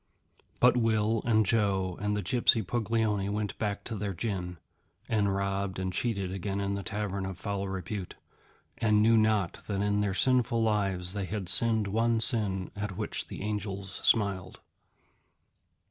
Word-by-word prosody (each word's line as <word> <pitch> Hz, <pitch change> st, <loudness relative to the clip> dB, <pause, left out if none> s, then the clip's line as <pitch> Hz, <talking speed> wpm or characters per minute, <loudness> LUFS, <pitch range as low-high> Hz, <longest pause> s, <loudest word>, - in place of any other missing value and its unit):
But 125 Hz, 0 st, +5 dB
Will 110 Hz, -2 st, +1 dB
and 110 Hz, -2 st, +3 dB
Joe 95 Hz, -4 st, +1 dB
and 105 Hz, 0 st, 0 dB
the 105 Hz, -, -3 dB
gypsy 120 Hz, -3 st, +3 dB
Puglioni 110 Hz, -2 st, 0 dB
went 105 Hz, 0 st, -3 dB
back 105 Hz, -2 st, -2 dB
to 115 Hz, -, -5 dB
their 100 Hz, -2 st, -4 dB
gin, 90 Hz, -3 st, -4 dB, 0.5 s
and 100 Hz, -3 st, +1 dB
robbed 100 Hz, -1 st, -2 dB
and 95 Hz, 0 st, -3 dB
cheated 100 Hz, -6 st, -1 dB
again 95 Hz, +1 st, -3 dB
in 100 Hz, 0 st, -1 dB
the 100 Hz, -, -3 dB
tavern 100 Hz, 0 st, -3 dB
of 95 Hz, -1 st, -5 dB
foul 100 Hz, -2 st, -3 dB
repute, 95 Hz, 0 st, -5 dB, 0.6 s
and 105 Hz, -2 st, +3 dB
knew 115 Hz, +1 st, +5 dB
not 110 Hz, -5 st, +1 dB
that 100 Hz, -2 st, -2 dB
in 105 Hz, 0 st, +1 dB
their 100 Hz, -2 st, -1 dB
sinful 120 Hz, -1 st, +2 dB
lives 100 Hz, -4 st, +1 dB
they 100 Hz, -2 st, -3 dB
had 100 Hz, -1 st, -4 dB
sinned 110 Hz, +2 st, +4 dB
one 115 Hz, +3 st, +1 dB
sin 105 Hz, -6 st, +4 dB
at 105 Hz, -2 st, -5 dB
which -, -, -3 dB
the -, -, -7 dB
Angels 100 Hz, -2 st, -4 dB
smiled. 100 Hz, -4 st, +1 dB
105 Hz, 160 wpm, -29 LUFS, 95-110 Hz, 0.6 s, But